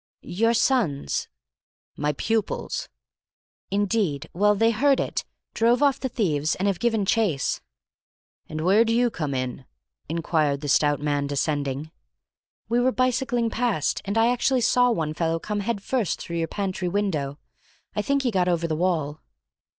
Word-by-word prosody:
"Your 230 Hz, +6 st, +1 dB
sons—" 225 Hz, -, +1 dB, 0.7 s
"My 150 Hz, 0 st, 0 dB
pupils." 220 Hz, +8 st, -2 dB, 0.8 s
"Indeed. 195 Hz, -7 st, 0 dB
Well, 210 Hz, +3 st, +3 dB
they 225 Hz, +3 st, +3 dB
heard 270 Hz, +5 st, +3 dB
it, -, -, -2 dB, 0.3 s
drove 235 Hz, +4 st, +3 dB
off 280 Hz, -1 st, +3 dB
the 260 Hz, -, -2 dB
thieves, 155 Hz, -, 0 dB
and 195 Hz, -, -1 dB
have 195 Hz, -3 st, 0 dB
given 225 Hz, -4 st, +1 dB
chase." 190 Hz, -10 st, +1 dB, 0.9 s
"And 155 Hz, 0 st, -4 dB
where 195 Hz, +7 st, +5 dB
do 230 Hz, 0 st, 0 dB
you 240 Hz, 0 st, +3 dB
come 150 Hz, -7 st, -3 dB
in?" 130 Hz, 0 st, -3 dB, 0.4 s
inquired 155 Hz, -3 st, 0 dB
the 145 Hz, -, -4 dB
stout 145 Hz, 0 st, +3 dB
man, 145 Hz, -1 st, 0 dB
descending. 145 Hz, +1 st, -2 dB, 0.8 s
"We 235 Hz, +2 st, +2 dB
were 255 Hz, +1 st, +3 dB
bicycling 250 Hz, -2 st, 0 dB
past, 225 Hz, -10 st, 0 dB
and 200 Hz, +2 st, -2 dB
I 230 Hz, +2 st, +4 dB
actually 250 Hz, +1 st, +1 dB
saw 245 Hz, +1 st, +4 dB
one 160 Hz, -9 st, -1 dB
fellow 165 Hz, +1 st, 0 dB
come 210 Hz, +5 st, -3 dB
head 205 Hz, -1 st, -2 dB
first 240 Hz, -6 st, -1 dB
through 170 Hz, -, -5 dB
your 165 Hz, -1 st, 0 dB
pantry 190 Hz, -2 st, -3 dB
window. 170 Hz, -8 st, -1 dB, 0.6 s
I 210 Hz, -, +1 dB
think 280 Hz, +5 st, 0 dB
he 245 Hz, -, +1 dB
got 185 Hz, -3 st, +1 dB
over 170 Hz, -1 st, +1 dB
the 160 Hz, -, -1 dB
wall." 155 Hz, -4 st, -1 dB
195 Hz, 160 wpm, -25 LUFS, 155-230 Hz, 0.9 s, where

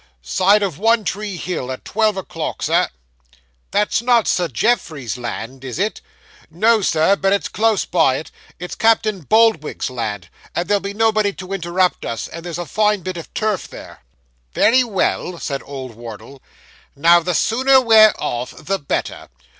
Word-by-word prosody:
'Side 195 Hz, -, +3 dB
of 180 Hz, -7 st, -3 dB
One 225 Hz, +1 st, +3 dB
tree 200 Hz, -1 st, -4 dB
Hill, 160 Hz, -7 st, -4 dB
at 130 Hz, -, -8 dB
twelve 215 Hz, -1 st, +1 dB
o'clock, 190 Hz, -, -5 dB
Sir.' -, -, +2 dB, 0.8 s
'That's 210 Hz, +2 st, +1 dB
not 235 Hz, -2 st, +3 dB
Sir 175 Hz, -1 st, +1 dB
Geoffrey's 155 Hz, -, -1 dB
land, 125 Hz, +1 st, -6 dB
is 130 Hz, -1 st, -6 dB
it?' 205 Hz, +4 st, -2 dB, 0.5 s
'No, 215 Hz, +7 st, +3 dB
Sir; 175 Hz, +1 st, +3 dB
but 195 Hz, -1 st, 0 dB
it's 200 Hz, -, +1 dB
close 220 Hz, -1 st, +1 dB
by 160 Hz, -7 st, +2 dB
it. 160 Hz, -, -8 dB, 0.3 s
It's 180 Hz, 0 st, -7 dB
Captain 220 Hz, -3 st, +2 dB
Boldwig's 215 Hz, -, +2 dB
land; 105 Hz, -7 st, -4 dB, 0.3 s
but 175 Hz, 0 st, -1 dB
there'll 205 Hz, -1 st, +2 dB
be 200 Hz, +1 st, -5 dB
nobody 215 Hz, -2 st, +2 dB
to 190 Hz, 0 st, -8 dB
interrupt 180 Hz, 0 st, 0 dB
us, 115 Hz, -1 st, -4 dB
and 170 Hz, -, -9 dB
there's 175 Hz, -2 st, -5 dB
a 175 Hz, -, -4 dB
fine 210 Hz, +5 st, +1 dB
bit 185 Hz, +1 st, -5 dB
of 165 Hz, -, -9 dB
turf 215 Hz, -3 st, -1 dB
there.' -, -, -12 dB, 0.5 s
'Very 255 Hz, +3 st, +4 dB
well,' 190 Hz, -5 st, -1 dB
said 140 Hz, -4 st, -4 dB
old 135 Hz, -3 st, -8 dB
Wardle. 115 Hz, +3 st, -11 dB, 0.5 s
'Now 170 Hz, +4 st, +5 dB
the 175 Hz, +1 st, -2 dB
sooner 260 Hz, +7 st, +4 dB
we're 220 Hz, -3 st, +6 dB
off 120 Hz, +1 st, -4 dB
the 195 Hz, +5 st, -3 dB
better. 140 Hz, -, -4 dB
185 Hz, 165 wpm, -19 LUFS, 145-215 Hz, 0.8 s, we're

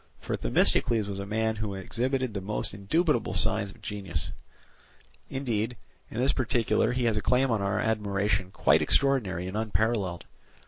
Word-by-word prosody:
For -, -, -3 dB
Themistocles 110 Hz, -, +3 dB
was 100 Hz, -1 st, -4 dB
a 100 Hz, -, -5 dB
man 110 Hz, +1 st, 0 dB
who 105 Hz, -2 st, -3 dB
exhibited 125 Hz, +5 st, -1 dB
the 100 Hz, -, -3 dB
most 105 Hz, +1 st, -2 dB
indubitable 120 Hz, -, 0 dB
signs 100 Hz, -, +2 dB
of -, -, -12 dB
genius; 95 Hz, -9 st, -3 dB, 1.0 s
indeed, 120 Hz, -3 st, -2 dB, 0.3 s
in 115 Hz, -, -5 dB
this 130 Hz, +2 st, +3 dB
particular 115 Hz, -3 st, +1 dB
he 125 Hz, 0 st, -1 dB
has 115 Hz, -2 st, +2 dB
a -, -, 0 dB
claim 125 Hz, +2 st, +2 dB
on 110 Hz, -3 st, +1 dB
our 100 Hz, +1 st, 0 dB
admiration 100 Hz, -3 st, 0 dB
quite 80 Hz, -4 st, +3 dB
extraordinary 100 Hz, -, +2 dB
and 95 Hz, +2 st, -5 dB
unparalleled. 110 Hz, -4 st, -1 dB
105 Hz, 155 wpm, -28 LUFS, 100-120 Hz, 1.0 s, Themistocles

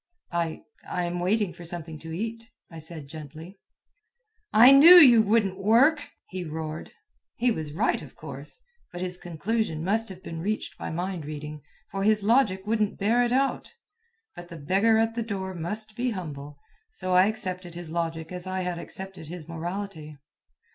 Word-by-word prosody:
"I... 170 Hz, -2 st, -2 dB, 0.3 s
I 180 Hz, -, -1 dB
am 175 Hz, 0 st, -3 dB
waiting 195 Hz, +1 st, +1 dB
for 175 Hz, -, -12 dB
something 165 Hz, -2 st, -6 dB
to 160 Hz, +1 st, -9 dB
eat," 225 Hz, +6 st, -5 dB, 0.2 s
I 165 Hz, -, -9 dB
said 160 Hz, -2 st, -7 dB
gently. 160 Hz, +5 st, -10 dB, 0.9 s
"I 240 Hz, +5 st, +8 dB
knew 305 Hz, +6 st, +10 dB
you 255 Hz, -10 st, +9 dB
wouldn't 205 Hz, -3 st, +1 dB
work!" 255 Hz, +10 st, +4 dB, 0.2 s
he 185 Hz, -1 st, -5 dB
roared. 155 Hz, -1 st, -6 dB, 0.4 s
He 245 Hz, +1 st, +2 dB
was 155 Hz, -7 st, -4 dB
right, -, -, +1 dB
of -, -, -12 dB
course; -, -, -8 dB, 0.3 s
but 175 Hz, -, -7 dB
his 180 Hz, 0 st, -3 dB
conclusion 175 Hz, 0 st, -2 dB
must 220 Hz, +4 st, +2 dB
have 185 Hz, -1 st, -10 dB
been 165 Hz, -, -6 dB
reached 210 Hz, +4 st, -3 dB
by -, -, -4 dB
mind 175 Hz, 0 st, -3 dB
reading, 150 Hz, 0 st, -7 dB, 0.3 s
for 195 Hz, -, -3 dB
his 215 Hz, 0 st, +3 dB
logic 205 Hz, -4 st, +2 dB
wouldn't 215 Hz, -1 st, 0 dB
bear 225 Hz, +5 st, +2 dB
it 240 Hz, -, 0 dB
out. 270 Hz, -, 0 dB, 0.6 s
But 175 Hz, -, -9 dB
the 170 Hz, -, -9 dB
beggar 195 Hz, +9 st, +2 dB
at 225 Hz, 0 st, +1 dB
the 235 Hz, -, -2 dB
door 195 Hz, -4 st, -4 dB
must 210 Hz, +6 st, -4 dB
be 250 Hz, +2 st, -1 dB
humble, 145 Hz, -8 st, -6 dB, 0.3 s
so 185 Hz, -1 st, -3 dB
I 185 Hz, +2 st, +6 dB
accepted 185 Hz, -5 st, -4 dB
his 170 Hz, -2 st, -7 dB
logic 165 Hz, -1 st, -3 dB
as 180 Hz, 0 st, -5 dB
I 185 Hz, 0 st, -2 dB
had 180 Hz, -1 st, -3 dB
accepted 190 Hz, -3 st, -9 dB
his 165 Hz, -1 st, -8 dB
morality. 165 Hz, -2 st, -6 dB
185 Hz, 175 wpm, -26 LUFS, 165-220 Hz, 0.9 s, knew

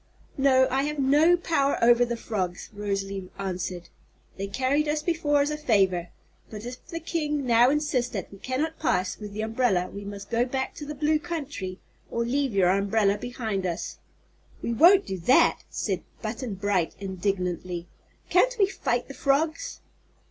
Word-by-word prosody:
"No; 260 Hz, -1 st, +5 dB
I 265 Hz, +1 st, +2 dB
have 300 Hz, 0 st, -3 dB
no 295 Hz, +6 st, +5 dB
power 300 Hz, -5 st, +1 dB
over 240 Hz, +1 st, +5 dB
the 240 Hz, -1 st, -2 dB
frogs," 185 Hz, -6 st, -4 dB
Rosalie 195 Hz, -2 st, -3 dB
answered. 180 Hz, -2 st, -4 dB, 0.5 s
"They 195 Hz, +1 st, -4 dB
carried 265 Hz, +8 st, +1 dB
us 300 Hz, 0 st, 0 dB
before 310 Hz, -4 st, +2 dB
as 290 Hz, +1 st, 0 dB
a 300 Hz, -, -2 dB
favor, 195 Hz, -, +2 dB, 0.4 s
but 215 Hz, 0 st, -8 dB
if 250 Hz, +1 st, -8 dB
the 335 Hz, -1 st, -5 dB
king 300 Hz, -4 st, -2 dB
now 240 Hz, +1 st, +5 dB
insists 290 Hz, -4 st, 0 dB
that 195 Hz, -5 st, -4 dB
we 195 Hz, -, -12 dB
cannot 295 Hz, +8 st, -2 dB
pass 185 Hz, -10 st, 0 dB
with 210 Hz, -1 st, -7 dB
the 210 Hz, +2 st, -4 dB
umbrella 220 Hz, -5 st, +1 dB
we 200 Hz, -, -6 dB
must 200 Hz, +1 st, -8 dB
go 235 Hz, +1 st, +3 dB
back 265 Hz, +1 st, -2 dB
to 295 Hz, -, -7 dB
the 300 Hz, -, -5 dB
Blue 305 Hz, +2 st, +2 dB
Country 285 Hz, -, -5 dB, 0.3 s
or 235 Hz, 0 st, -1 dB
leave 270 Hz, +2 st, 0 dB
your 185 Hz, -2 st, +4 dB
umbrella 200 Hz, +1 st, +2 dB
behind 220 Hz, -6 st, -3 dB
us." 170 Hz, -, -4 dB, 0.6 s
"We 235 Hz, -, -1 dB
won't 360 Hz, -, +6 dB
do 190 Hz, -1 st, -4 dB
that!" 250 Hz, +10 st, +4 dB
said 190 Hz, -4 st, -2 dB, 0.2 s
Button 225 Hz, 0 st, -4 dB
Bright, 195 Hz, -3 st, 0 dB
indignantly. 180 Hz, -2 st, -2 dB, 0.5 s
"Can't -, -, +4 dB
we 405 Hz, -, +5 dB
fight 245 Hz, -10 st, -2 dB
the 275 Hz, -, -8 dB
frogs?" 315 Hz, -, 0 dB
240 Hz, 170 wpm, -26 LUFS, 195-295 Hz, 0.6 s, won't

